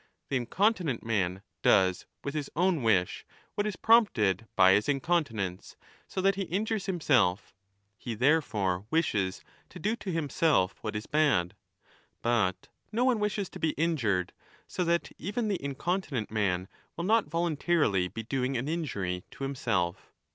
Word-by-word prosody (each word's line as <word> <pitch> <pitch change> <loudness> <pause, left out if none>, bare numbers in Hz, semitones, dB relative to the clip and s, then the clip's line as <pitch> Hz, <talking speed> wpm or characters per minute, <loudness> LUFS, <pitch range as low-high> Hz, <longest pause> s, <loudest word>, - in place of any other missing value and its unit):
The 140 - -1
incontinent 165 - 0
man 95 -4 -1 0.2
does 95 -1 +3 0.2
with 140 - -3
his 150 -2 -3
own 175 -2 +2
wish 95 -6 +1
^ - - -29 0.2
what 205 +1 -1
is 210 - -3
prompted 115 - +3
by 95 -1 +7
his 105 +2 +2
incon 155 +4 +2
tinence, 100 -7 -5 0.3
so 190 - -3
that 195 +1 +4
he 195 - -4
injures 205 +4 -2
himself; 125 - +1 0.5
he 120 -3 -5
therefore 105 - +1
wishes 105 - 0 0.3
to - - -11
do 215 +7 0
to 195 - -5
himself 150 - +1
what 110 -1 -4
is 105 - -3
bad. 140 - +2 0.7
But 110 -6 +1 0.2
no 235 +3 +1
one 250 -4 +3
wishes 210 -1 -1
to - - -10
be 160 -2 +1
injured, 120 - 0 0.3
so 180 - -2
that 170 0 0
even 210 +5 -2
the 195 -8 -2
incontinent 140 - -2
man 95 -4 0 0.3
will 170 - -3
not 220 -4 +3
volun 165 0 0
tarily 105 - +1
be 115 - -5
doing 130 +2 -1
an 125 +4 -3
injury 100 - -2
to - - -9
himself. 110 -10 -2
135 Hz, 160 wpm, -29 LUFS, -, 0.7 s, by